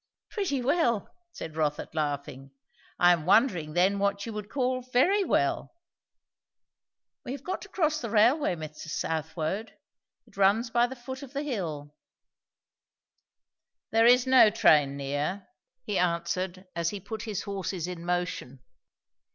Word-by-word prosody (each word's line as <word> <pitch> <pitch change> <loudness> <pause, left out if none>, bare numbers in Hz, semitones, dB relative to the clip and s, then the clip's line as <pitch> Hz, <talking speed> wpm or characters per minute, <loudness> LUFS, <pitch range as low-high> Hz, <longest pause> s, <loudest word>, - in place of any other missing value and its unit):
"Pretty 340 - -1
well!" 240 - +1 0.2
said 160 - -8
Rotha 150 -2 -1
laughing. 140 -3 -3 0.5
"I 175 0 +6
am 165 -3 -2
wondering 185 - +3
then 190 +4 +2
what 200 0 0
you 230 - -6
would 210 -1 -6
call 255 -1 -1
very 260 +12 +2
well? 360 - 0 1.5
We 250 - -5
have 280 - -8
got 370 - -4
to - - -11
cross 310 -4 0
the 230 - -4
railway, 230 - +3
Mr. 155 -1 -8
Southwode. 160 +6 -3 0.5
It - - -22
runs 205 +4 +3
by 240 +1 +3
the 265 - -8
foot 260 +1 -8
of 275 -1 -10
the 285 +1 -2
hill." 160 - -4 2.0
"There 225 +1 +5
is 250 +1 +6
no 260 -4 +7
train 150 -10 +4
near," 145 +8 -3 0.4
he 200 - -1
answered 180 +2 -1
as 170 -1 0
he 205 - -5
put 215 +3 -7
his 215 -4 -4
horses 190 -3 -4
in 180 -2 -6
motion. 175 -7 -3
200 Hz, 145 wpm, -28 LUFS, 165-245 Hz, 2.0 s, no